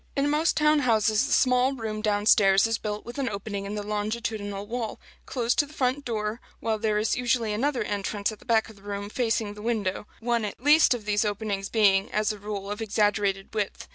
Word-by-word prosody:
In 285 0 +1
most 310 +3 +2
town 300 0 +4
houses 220 -1 +2
the - - -5
small 255 +1 +3
room 220 -3 -4
down 210 -1 0
stairs 195 -2 +5
is 225 0 0
built 210 -1 -4
with 240 +3 -7
an 265 -3 0
opening 200 -1 -5
in 200 +1 -4
the 210 - -3
longitudinal 210 -1 -3
wall, 230 0 -4 0.3
close 240 -2 0
to 290 - +1
the 300 - -15
front 270 -1 0
door, 220 0 -3 0.2
while 220 -1 -1
there 215 -1 +1
is 215 +1 +1
usually 240 -3 0
another 250 +2 0
entrance 205 0 -2
at 215 - -11
the - - -18
back 225 -2 +2
of 220 - -13
the - - -18
room, 200 0 -5
facing 225 -4 0
the 210 - -11
window; 210 -3 -2
one 235 0 0
at 210 - -5
least 290 -1 +5
of 225 -4 -8
these 210 0 +1
openings 205 -2 -2
being, 200 -3 +3
as 215 0 +1
a 210 - -7
rule, 200 -1 -5
of 210 +2 -5
exaggerated 205 -2 0
width. 210 -2 -3
215 Hz, 220 wpm, -26 LUFS, 205-240 Hz, 0.3 s, stairs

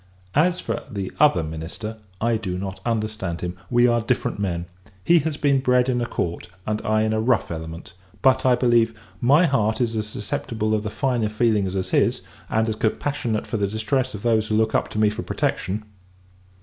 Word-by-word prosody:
As 175 +5 +3
for - - -3
the 100 -2 -4
other 140 - +5
minister, 80 +8 -6 0.2
I 115 +1 +2
do 95 -5 -3
not 95 0 -5
understand 110 -6 -2
him; 90 0 -3
we 120 0 +4
are 120 -1 +2
different 115 -2 -1
men! 85 -4 -1 0.4
He 170 - +5
has 155 -1 -2
been 140 -3 +3
bred 125 -1 +3
in 120 -1 +1
a 120 - -1
court, 85 -6 -3 0.2
and 105 0 -1
I 110 0 +2
in 110 0 +1
a 110 - +1
rough 120 -4 +1
element. 80 +2 -7 0.3
But, 130 0 +4
I 125 -1 +5
believe, 120 -2 +3 0.3
my 145 +8 +5
heart 110 -7 +1
is 115 -2 0
as 105 -1 -2
susceptible 110 +1 -2
of 110 - +1
the 105 - -3
finer 110 +1 0
feelings 105 -4 +1
as 95 -1 -2
his, - - +2 0.3
and 110 +1 +1
as 110 -1 -2
compassionate 115 0 -1
for 115 - -3
the 100 -1 +1
distress 110 +4 -1
of 100 - -8
those 110 -2 +2
who 110 - +1
look 110 0 +2
up - - +1
to - - -7
me 105 -1 +4
for 110 +2 -5
protection. 100 0 -2
110 Hz, 200 wpm, -23 LUFS, 105-120 Hz, 0.4 s, other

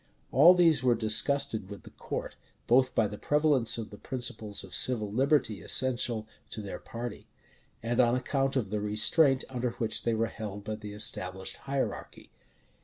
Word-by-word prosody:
All 170 +7 +6
these 165 -6 +4
were 125 -2 +3
disgusted 110 -1 +1
with 100 - -10
the - - -14
court, - - -7 0.3
both 130 +1 +2
by 110 - +2
the 105 0 -9
prevalence 145 -6 +2
of 110 -2 -7
the 105 - -12
principles 115 -6 0
of 95 - -12
civil 110 -5 +3
liberty 130 -3 0
essential 120 -4 +1 0.2
to - - -6
their 100 - -8
party, 120 +1 -8 0.6
and 120 +1 -2
on 120 -1 +3
account 135 +2 -2
of 110 -7 -2
the 105 -1 -2
restraint 130 +7 +3
under 125 -1 -3
which 115 -2 -1
they 115 -1 -1
were 115 +1 0
held 105 -2 -8
by 110 +1 -5
the 105 -1 -10
established 95 -2 -1
hierarchy. 140 -1 -5
115 Hz, 170 wpm, -28 LUFS, 105-130 Hz, 0.6 s, All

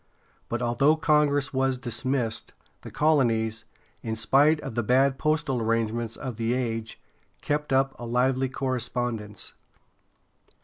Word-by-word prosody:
But 120 +1 -2
although 130 +6 +3
Congress 150 -3 +2
was 130 0 +1
dismissed, 120 -1 -2 0.3
the - - -9
colonies, 115 -7 +1 0.4
in 110 -1 -3
spite 145 +7 +3
of - - -6
the 120 - 0
bad 130 +4 +2
postal 155 -5 0
arrangements 115 0 -1
of 125 -5 -6
the 115 +1 0
age, 115 -3 -3 0.4
kept 150 -1 -1
up 135 0 +2
a 120 - -6
lively 130 +2 +1
correspondence. 120 -5 -3
125 Hz, 125 wpm, -26 LUFS, 115-135 Hz, 0.4 s, although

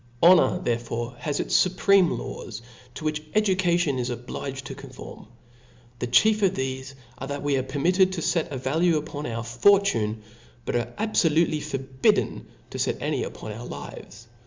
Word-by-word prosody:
Honor 170 -6 +6
therefore 120 0 -3
has 145 -2 -2
its - - -1
fupreme 185 0 +3
laws, 115 -1 -7 0.3
to - - -7
which 155 0 -1
education 175 -8 +2
is 125 0 -2
obliged 130 +2 -5
to - - -6
conform - - -11 0.4
*. 120 0 -28
The 120 - -2
chief 215 - +4
of 195 -2 +3
tbefe 130 -2 -4 0.2
are, 135 - -5
that 145 0 -4
we 145 -1 +1
are - - +1
permitted 180 +8 +2
to 175 - -3
fet 165 -2 +1
a 135 - -3
value 160 +6 +2
upon 150 -1 -5
our 115 -1 -3
fortune, 120 - +2 0.4
but - - -2
are 120 - -1
abfolutely 165 -7 +2
forbidden 135 -3 0 0.2
to - - -5
fet - - 0
any - - -1
upon 110 - -7
our 115 +3 -7
lives. 105 +4 -9
140 Hz, 165 wpm, -25 LUFS, 120-175 Hz, 0.4 s, Honor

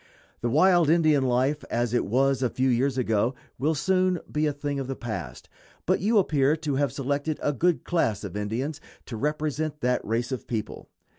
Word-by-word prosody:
The 120 - 0
wild 170 +3 +4
Indian 155 -4 +4
life 130 +4 +1
as 120 0 -1
it 120 - +1
was 135 +4 +2
a 125 - +2
few 130 +2 0
years 130 +2 +1
ago 115 0 +1 0.2
will 155 +4 +1
soon 185 +4 +1
be 150 0 +1
a - - +1
thing 145 0 -3
of 135 - -4
the 135 - -3
past, 110 - -6 0.4
but - - +2
you 215 +3 +2
appear 150 -6 +3
to 155 -3 -3
have 140 -3 +1
selected 145 +4 -2
a 145 - 0
good 170 +5 +1
class 110 - 0
of 100 -2 -6
Indians 120 +9 -3 0.2
to 120 - -7
represent 150 +3 -2
that 125 0 +1
race 120 +3 -2
of 130 - -4
people. 110 -3 -5
140 Hz, 195 wpm, -26 LUFS, 120-155 Hz, 0.4 s, wild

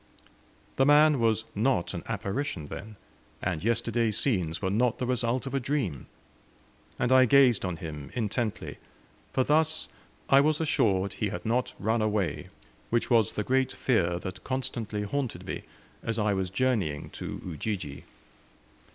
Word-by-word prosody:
The 135 - +4
man 150 -1 +6
was 110 -1 +2
not 110 -4 +1
an - - -4
apparition, 100 - -3
then, 105 +8 -8 0.4
and 90 -3 -2
yesterday's 115 -1 +1
scenes 90 - 0
were 95 - -1
not 120 +3 +2
the 125 - -2
result 125 0 0
of 135 - -5
a 135 - +2
dream! 120 - -2 0.9
and 125 - 0
I 130 0 +7
gazed 130 -3 +5
on 90 -3 -2
him 75 -3 -7
intently, 115 -1 -2 0.5
for 130 - +2
thus 160 +3 +2 0.4
I 135 0 +6
was 155 +1 +2
assured 100 -11 +1
he 105 - -2
had 90 -2 -6
not 120 +3 0
run 110 +2 0
away, 105 -3 -1 0.4
which 120 +2 0
was 115 -4 +4
the 105 - -2
great 130 +3 +1
fear 90 -12 +1
that 95 +1 -7
constantly 115 -5 -3
haunted 130 +3 -3
me - - -4 0.4
as 115 -1 -2
I 105 -2 +2
was 95 -1 -1
journeying 100 - 0
to - - -6
Ujiji. 90 -3 -4
115 Hz, 150 wpm, -28 LUFS, 95-130 Hz, 0.9 s, I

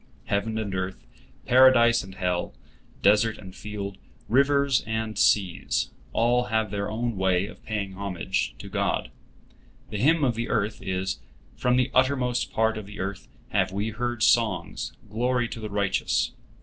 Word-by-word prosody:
Heaven 110 +2 -1
and 105 -3 -3
earth, 95 0 -4 0.4
Paradise 120 -2 +6
and 95 -1 -11
hell, 90 -2 -1 0.5
desert 105 +2 +4
and 95 -2 -11
field, 100 -2 -6 0.3
rivers 140 +1 +3
and 110 -1 -2
seas—all 115 +5 +1
have 110 -2 0
their 100 0 -2
own 115 0 -2
way 95 0 +2
of - - -12
paying 100 -3 -3
homage 95 -3 -2
to - - -9
God. - - -1 0.8
The 105 - -3
hymn 150 +6 +4
of 125 -3 +3
the 115 +1 -3
earth 105 +1 -1
is, 95 0 -2 0.4
"From 125 0 +2
the 125 +1 +2
uttermost 130 -2 +2
part 110 0 +1
of 105 - -9
the 105 - -10
earth 95 0 -4 0.2
have - - +1
we 100 +3 -2
heard 120 +1 -2
songs, 115 -5 +1
glory 120 +3 0
to 115 - -6
the 110 -1 -5
Righteous." 100 -3 0
110 Hz, 150 wpm, -26 LUFS, 100-120 Hz, 0.8 s, Paradise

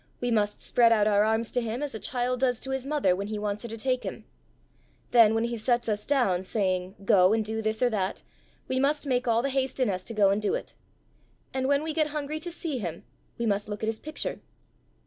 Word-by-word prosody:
We 245 -1 -1
must 210 -2 +1
spread 235 -1 +4
out 215 -2 +4
our 205 -1 +4
arms 220 +1 0
to 245 - 0
him 230 +4 -3
as 290 - -3
a 220 - -5
child 250 0 -1
does 250 -2 +1
to 265 - -5
his 265 0 -2
mother 280 -12 +2
when 200 +2 -4
he 215 0 -3
wants 210 0 -2
her 235 - -6
to 225 - -6
take 255 +2 -1
him; - - -6 0.9
then 225 -3 +6
when 225 - +1
he 235 0 -1
sets 240 +2 +1
us 210 -1 -2
down, 220 -11 +2
saying, 185 -2 -1
'Go 185 0 +5
and 220 -1 +1
do 220 +1 -2
this 220 +2 0
or 245 - +4
that,' 195 -3 -2 0.4
we 260 - 0
must 290 +3 +1
make 250 -2 0
all 230 0 +3
the 275 - 0
haste 265 0 -1
in 250 -5 +2
us 185 -1 -4
to 230 - -7
go 200 -2 +5
and 200 +2 0
do 210 - +1
it. - - -6 0.8
And 260 0 0
when 285 +1 +2
we 315 0 -2
get 310 -1 +2
hungry 300 0 -3
to 345 +2 -6
see 330 -5 -3
him, 170 -5 -5 0.3
we 235 - -2
must 205 -1 0
look 210 +1 -5
at - - 0
his 225 - -3
picture." 310 0 -4
230 Hz, 245 wpm, -27 LUFS, 210-260 Hz, 0.9 s, then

